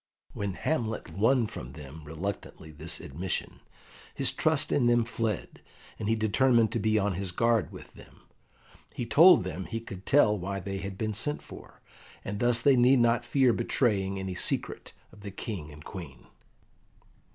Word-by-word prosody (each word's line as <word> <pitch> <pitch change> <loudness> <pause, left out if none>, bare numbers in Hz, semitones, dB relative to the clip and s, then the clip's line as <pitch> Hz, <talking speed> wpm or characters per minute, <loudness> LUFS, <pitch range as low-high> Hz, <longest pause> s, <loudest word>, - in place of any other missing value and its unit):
When 100 -2 -3
Hamlet 115 - -2
won 115 +7 +2
from 65 - -8
them 75 +1 -10
reluctantly 80 0 -6
this 80 +3 -3
admission, 85 +6 -5 0.6
his - - +2
trust - - +1
in 125 -4 +3
them 120 -1 +4
fled, 115 -4 -3 0.4
and 105 -1 -2
he 115 - +3
determined 115 +1 +3
to 115 - -1
be 110 0 +2
on 100 -1 +1
his 95 0 -3
guard 115 +3 +1
with - - -12
them. - - -17 0.7
He 120 - -3
told 165 - +7
them 90 0 -5
he 115 +8 -4
could 95 -4 -10
tell 120 -7 +5
why 100 +2 -4
they 95 +1 -5
had 95 0 -6
been 110 0 -2
sent 150 +8 -2
for, - - -13 0.4
and 100 +1 -4
thus 120 0 +3
they 140 -2 +6
need 125 +2 +5
not 120 -1 +3
fear 130 -4 +3
betraying 100 -5 0
any 95 -1 -4
secret 90 - -2 0.2
of 105 - -16
the 100 - -7
King 95 -5 -6
and 75 +1 -13
Queen. 75 -10 -9
105 Hz, 170 wpm, -28 LUFS, 90-115 Hz, 0.7 s, told